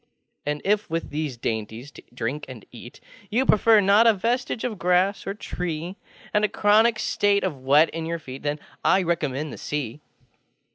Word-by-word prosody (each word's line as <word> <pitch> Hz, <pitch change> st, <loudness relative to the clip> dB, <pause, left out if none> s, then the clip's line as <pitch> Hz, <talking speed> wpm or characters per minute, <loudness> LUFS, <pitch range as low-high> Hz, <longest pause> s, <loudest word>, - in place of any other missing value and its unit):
And 150 Hz, 0 st, -2 dB
if, 210 Hz, 0 st, +1 dB
with 165 Hz, +1 st, -3 dB
these 150 Hz, -4 st, -3 dB
dainties 115 Hz, +4 st, -4 dB
to -, -, -13 dB
drink 125 Hz, +5 st, -4 dB
and 125 Hz, -6 st, -10 dB
eat, 120 Hz, 0 st, -12 dB, 0.3 s
You 250 Hz, +5 st, +1 dB
prefer 220 Hz, -1 st, +5 dB
not 205 Hz, +4 st, +5 dB
a 225 Hz, -, +5 dB
vestige 235 Hz, +3 st, -1 dB
of 220 Hz, -6 st, -3 dB
grass 180 Hz, +3 st, +1 dB
or 195 Hz, -, -3 dB
tree, 175 Hz, -3 st, -5 dB, 0.4 s
And 210 Hz, -, +2 dB
a 210 Hz, -, +3 dB
chronic 215 Hz, +3 st, +3 dB
state 205 Hz, -1 st, +1 dB
of 160 Hz, -8 st, -2 dB
wet 145 Hz, +5 st, +4 dB
in 165 Hz, -1 st, -4 dB
your 170 Hz, 0 st, -2 dB
feet, 135 Hz, -4 st, -9 dB
ThenŌĆöI 150 Hz, +5 st, -1 dB
recommend 150 Hz, -3 st, -2 dB
the -, -, -9 dB
Sea. 150 Hz, -2 st, -4 dB
165 Hz, 175 wpm, -24 LUFS, 145-205 Hz, 0.4 s, prefer